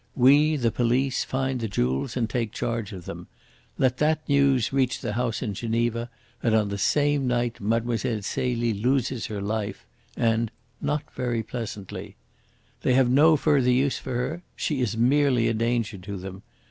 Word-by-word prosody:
We, 145 +5 +5
the 120 -5 +1
police, 125 +3 +1
find 130 -1 -2
the 115 - -2
jewels 65 - -1
and 115 -2 +1
take 115 -1 -2
charge 115 -3 -3
of 90 -4 -8
them. - - -8 0.5
Let 130 -1 +2
that 155 +1 +1
news 140 -4 +3
reach 130 -2 +1
the 115 -5 -3
house 120 +1 -1
in 105 -4 -2
Geneva, 115 +2 -1 0.3
and 115 -2 +2
on 105 -2 +2
the 100 0 -4
same 145 0 +2
night 120 -2 -1
Mlle. 115 +2 0
Celie 115 +2 -1
loses 125 +3 0
her 105 -2 -4
life, 105 -1 -3 0.3
and 115 -1 +1 0.3
not 145 0 -1
very 120 -3 -1
pleasantly. 110 -4 -6 0.7
They 125 - +2
have 130 -2 +4
no 155 +4 +6
further 140 -4 +3
use 130 +2 +2
for 130 - -5
her. 130 +8 -2
She 145 -4 -1
is 115 -2 -1
merely 130 0 +3
a - - +1
danger 115 -2 -1
to 100 +2 -6
them. 95 +1 -8
120 Hz, 170 wpm, -25 LUFS, 110-130 Hz, 0.7 s, no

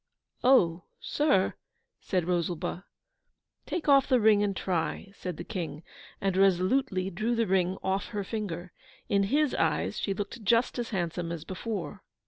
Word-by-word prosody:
'Oh, 180 -10 +4
sir!' 290 -11 +2 0.5
said 180 -4 -1
Rosalba. 175 +1 -1 0.8
'Take 350 - -3
off 275 -2 +6
the 255 -2 +4
ring 215 -2 +5
and 200 -1 0
try,' 180 +2 -2
said 180 -4 -6
the - - -5
King, 170 -6 -5 0.4
and 195 -1 0
resolutely 190 +2 +2
drew 215 +6 -1
the 230 0 +2
ring 185 -1 +1
off 190 +1 0
her 205 -2 -3
finger. 185 -4 -4 0.4
In 200 -1 +3
HIS 290 +6 +2
eyes - - 0
she 195 - -1
looked 205 +3 -5
just 235 +4 +2
as 240 - -3
handsome 175 -3 -2
as 165 -2 -5
before! 190 0 -5
195 Hz, 150 wpm, -29 LUFS, 180-225 Hz, 0.8 s, off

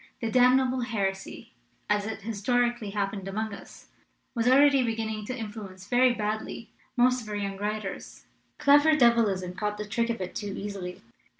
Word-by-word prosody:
The 225 -1 -2
damnable 255 +1 +4
heresy, 200 - -3 0.3
as 210 0 +1
it 220 0 -5
his 215 0 -5
torically 240 -3 +1
happened 195 -1 -2
among 215 +2 -3
us, - - -12 0.4
was 230 -1 0
already 275 +1 +6
begin 225 -2 -1
ning 215 -1 -5
to 255 - -4
influence 205 -4 -8
very 250 +3 +4
badly 220 0 -4 0.3
most 250 +1 +4
of 215 - -10
our 210 - -3
young 200 -1 -3
writers. 210 -1 -5 0.3
Clever 290 +1 +5
devilism 220 -9 +3
caught 210 +2 -2
the 210 - -4
trick 230 +3 -1
of 230 - -2
it 185 -1 -5
too 205 -2 -4
easily. 195 -3 -6
220 Hz, 170 wpm, -27 LUFS, 200-245 Hz, 0.4 s, already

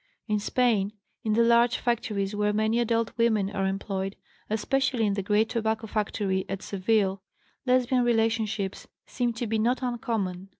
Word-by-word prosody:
In 210 -1 +1
Spain, 215 -3 +1 0.3
in 215 - +1
the 235 +2 +4
large 235 +1 +4
factories 215 -4 -1
where 210 0 +1
many 220 +2 +1
adult 230 -1 0
women 215 -4 +2
are 195 -2 -1
employed, 195 0 -3 0.3
especially 245 +2 +1
in 205 - +1
the 200 - -1
great 210 +3 +2
tobacco 220 -1 -1
factory 205 -3 -1
at 195 0 -4
Seville, 195 -1 +1 0.5
Lesbian 255 0 +3
relationships 225 -4 0 0.2
seem 245 -1 -1
to 230 +1 -3
be 220 0 0
not 245 +4 +1
uncommon. 220 -7 -2
220 Hz, 155 wpm, -27 LUFS, 200-235 Hz, 0.5 s, the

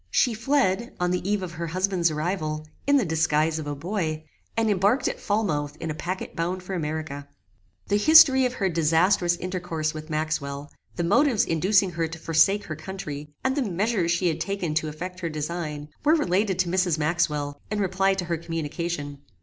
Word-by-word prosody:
She 240 - +2
fled, 235 -2 0
on 180 0 +1
the 180 - 0
eve 205 -2 0
of 180 - -5
her 170 0 -5
husband's 185 0 +1
arrival, 155 -1 -2 0.2
in 285 0 +5
the 250 - +2
disguise 160 -1 +1
of 150 - -6
a 145 - -3
boy, 160 -1 -3 0.3
and 225 -1 +2
embarked 205 +5 +2
at - - -3
Falmouth 155 -9 -1
in 160 - -3
a - - -2
packet 185 +4 -5
bound 180 +2 -2
for 190 - -6
America. 155 -4 -4 0.6
The 205 - +1
history 270 0 +7
of 250 - -6
her 200 -6 0
disastrous 170 +2 +3
intercourse 175 -4 -3
with 155 +1 -8
Maxwell, 150 -2 -3 0.2
the 175 - -1
motives 225 - +3
inducing 185 +4 +2
her 165 -1 -1
to 160 0 -8
forsake 165 +6 +3
her 155 - -5
country, 155 -3 -7
and 265 0 +1
the 290 - +1
measures 200 -3 0
she 175 +1 +1
had 160 -1 -1
taken 190 -4 -2
to 155 0 0
effect 180 +4 -6
her 170 -2 -3
design, 155 -1 -4
were 305 +2 +5
related 195 - +1
to 185 -2 +1
Mrs. 180 -2 +1
Maxwell, 150 -2 -1
in 210 0 -2
reply 195 0 +2
to 185 -2 -3
her 170 -1 -1
communication. 165 -2 -4
175 Hz, 190 wpm, -25 LUFS, 155-195 Hz, 0.6 s, history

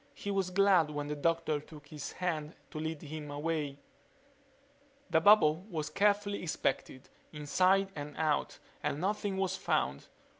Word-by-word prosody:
He 205 - -4
was 195 -2 0
glad 185 -4 +4
when 145 -1 -3
the 150 +1 -3
doctor 165 0 +1
took 150 -1 -14
his 150 -2 -6
hand 160 -4 -3 0.2
to 155 - -5
lead 160 -1 -4
him 150 0 -7
away... 145 -1 -2 1.3
The 160 - +4
bubble 165 -4 +6
was 155 -4 -3
carefully 205 +2 +2
inspected, 145 -5 -2 0.2
inside 185 +6 +2
and 145 -1 -7
out, 155 -2 0 0.2
and 145 - -1
nothing 200 +1 -1
was 190 -1 0
found. 70 - -1
160 Hz, 145 wpm, -32 LUFS, 150-190 Hz, 1.3 s, bubble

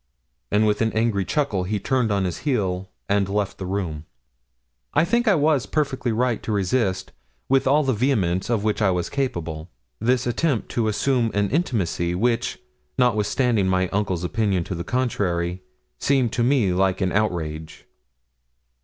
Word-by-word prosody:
And, 105 +1 +3
with 105 +1 +1
an 110 0 +2
angry 110 -3 +1
chuckle, 135 -8 0
he 105 +2 -1
turned 125 -1 0
on 100 -1 +1
his 90 -3 -3
heel, 95 -9 -1 0.2
and 100 -1 +1
left 100 -1 -2
the 95 - -4
room. 85 -6 -3 0.9
I - - +4
think 235 +6 +1
I 205 - +5
was 150 -3 +2
perfectly 135 -5 -1
right 120 +1 0
to - - -4
resist, 100 -1 0 0.4
with 135 0 +2
all 145 +3 +4
the 135 -1 +1
vehemence 100 -7 0
of 115 -4 +1
which 110 0 0
I 105 - +4
was 90 -2 -1
capable, 85 - -3 0.3
this 125 +3 +1
attempt 125 +1 0
to 115 -2 0
assume 120 +2 +1
an 100 -1 +1
intimacy 95 - 0
which, 120 +4 0 0.4
notwithstanding 115 -2 +2
my 95 -1 +1
uncle's 100 -4 -1
opinion 95 -1 0
to 95 - -5
the 85 -1 -4
contrary, 90 -7 -1 0.4
seemed 130 -5 +1
to 120 - 0
me 120 -7 +3
like 95 0 +1
an 95 -1 +1
outrage. 80 -7 -2
105 Hz, 160 wpm, -23 LUFS, 95-125 Hz, 0.9 s, I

